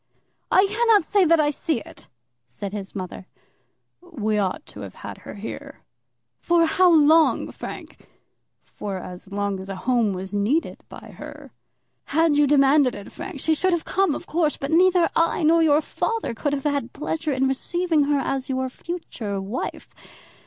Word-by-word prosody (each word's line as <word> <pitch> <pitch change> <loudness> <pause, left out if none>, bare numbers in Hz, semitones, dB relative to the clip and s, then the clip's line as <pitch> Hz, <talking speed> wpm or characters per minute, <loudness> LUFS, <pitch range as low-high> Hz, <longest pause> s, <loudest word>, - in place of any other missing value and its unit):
"I 380 - +6
cannot 425 -2 +3
say 400 -3 +3
that 330 0 +4
I 295 -1 +3
see 310 -2 -1
it," - - -14 0.4
said 195 +12 -7
his 200 -2 -7
mother. 185 0 -6 0.7
"We 220 -12 -2
ought 190 -2 -2
to - - -12
have 100 -2 -8
had - - -9
her - - -10
here." - - -8 0.6
"For 340 -1 +3
how 360 +2 +4
long, 315 0 +4
Frank?" - - -9 0.6
"For 200 -2 -6
as 180 +1 -9
long 200 -1 -2
as 190 +1 -9
a 195 - -4
home 235 -5 +2
was 190 +1 -6
needed 215 +11 0
by - - -11
her." - - -10 0.5
"Had 320 +1 +2
you 295 0 +4
demanded 275 -2 +4
it, 205 - -10
Frank, 275 - -7
she 320 - +2
should 370 +4 +1
have 340 - -1
come, 380 -6 +1
of - - -7
course. 315 -2 0
But 275 +2 -4
neither 355 +1 +4
I 330 0 +2
nor 330 +2 +5
your 305 -1 +4
father 455 - -2
could 285 +5 -2
have 275 -1 -2
had 285 -5 -1
pleasure 310 +1 -3
in 265 0 +1
receiving 320 +3 0
her 290 0 +2
as 270 -1 -2
your 260 0 -1
future 250 - -5
wife. 200 +6 -5
290 Hz, 175 wpm, -23 LUFS, 210-330 Hz, 0.7 s, I